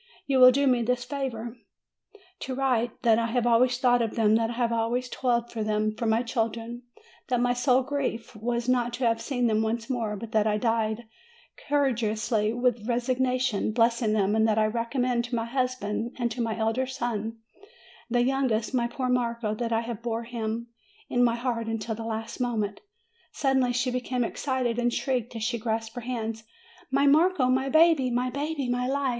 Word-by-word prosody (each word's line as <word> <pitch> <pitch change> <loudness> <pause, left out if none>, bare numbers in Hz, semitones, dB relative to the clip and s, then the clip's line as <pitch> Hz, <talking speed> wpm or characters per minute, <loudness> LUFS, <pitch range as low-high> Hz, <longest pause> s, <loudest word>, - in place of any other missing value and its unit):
You 270 -2 +2
will 255 0 +10
do 280 +3 +2
me 250 -3 +3
the 250 +2 +2
favor 245 -2 -5 0.8
to 260 - -4
write 250 -4 0
that 230 -2 +4
I 230 - 0
have 240 +1 0
always 240 +1 +4
thought 245 -1 +3
of 225 -2 -2
them, 215 -2 +3
that 225 0 +2
I - - -3
have 235 -1 0
always 235 +2 0
toiled 240 -2 0
for 225 -2 -3
them 215 0 0
for 225 +1 -3
my 220 +2 +2
children 230 0 -3 0.5
that 250 -2 +1
my 245 0 +2
sole 250 +1 +3
grief 265 -5 -3
was 235 +2 -2
not 245 -1 +1
to 245 +1 -1
have 230 -1 +1
seen 245 0 -1
them 220 -2 +2
once 225 +3 -2
more 225 -4 -1
but 225 +2 -8
that 215 -1 +2
I 210 -1 +1
died 225 0 -1 0.6
courageously 225 -6 +1
with 240 -2 0
resignation 250 -2 0
blessing 230 -1 +2
them; 205 0 +2
and 220 0 +3
that 215 -1 +1
I 215 - +4
recommend 235 +2 0
to 240 0 -3
my 230 -1 -1
husband 240 -2 -2
and 240 -2 -1
to 240 - -3
my 225 -1 -1
elder 225 +4 0
son 230 -4 -3 0.7
the 240 0 +2
youngest, 255 -4 0
my 240 -2 +1
poor 255 +1 -3
Marco 235 -3 0
that 230 +1 -3
I 230 +1 -1
bore 230 +1 -3
him 230 0 -4 0.4
in 245 - +2
my 235 -1 +3
heart 235 -2 -2
until 225 0 -2
the 225 +1 -6
last 225 +1 -5
mo 245 -2 -1
ment 205 -1 -2 0.3
" 460 0 -37
suddenly 265 -3 +2
she 250 +1 0
became 250 0 -1
excited, 250 -1 -1
and 240 0 +1
shrieked, 245 -2 -2
as 225 - -4
she 235 0 -1
clasped 225 0 -2
her 245 - -6
hands: 225 -2 -4 0.5
"My 275 +1 +2
Marco, 300 -1 +4
my 265 +1 +1
baby, 315 -4 +4
my 250 +1 0
baby! 285 0 -2
My 245 0 0
life!" 275 0 0
240 Hz, 195 wpm, -27 LUFS, 225-255 Hz, 0.8 s, will